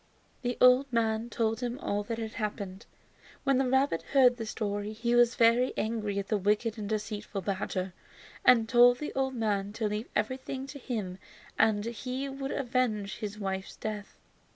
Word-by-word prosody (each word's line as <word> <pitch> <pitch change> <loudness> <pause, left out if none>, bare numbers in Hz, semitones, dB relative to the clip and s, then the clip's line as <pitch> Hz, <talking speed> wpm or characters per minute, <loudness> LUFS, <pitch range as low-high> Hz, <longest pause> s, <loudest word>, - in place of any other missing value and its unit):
The 245 -1 -2
old 250 +2 +6
man 225 0 0
told 225 -1 0
him 245 0 -3
all 205 -7 -1
that 230 +1 -3
had 225 -1 -5
happened. 205 -2 -5 0.6
When 275 -2 +3
the 265 -1 +1
rabbit 265 -9 +2
heard 250 -3 +6
the 225 -2 -5
story 205 -1 -3
he 235 +2 -1
was 240 0 +5
very 235 +2 +4
angry 215 -2 -1
at 200 0 -2
the 215 - +1
wicked 210 +3 +1
and 205 -1 -4
deceitful 210 -1 -3
badger, 190 -1 -2 0.5
and 230 -3 +6
told 245 +1 +6
the 300 - -5
old 265 -1 -1
man 205 -3 -1
to 220 -1 -1
leave 210 +2 -3
everything 260 +4 -2
to 280 +1 -9
him 205 -8 -4 0.4
and 215 -1 +3
he 250 +3 -4
would 270 0 -5
avenge 240 -7 -1
his 210 -2 -5
wife's 190 -2 -4
death. 210 -2 -6
225 Hz, 175 wpm, -30 LUFS, 205-250 Hz, 0.6 s, old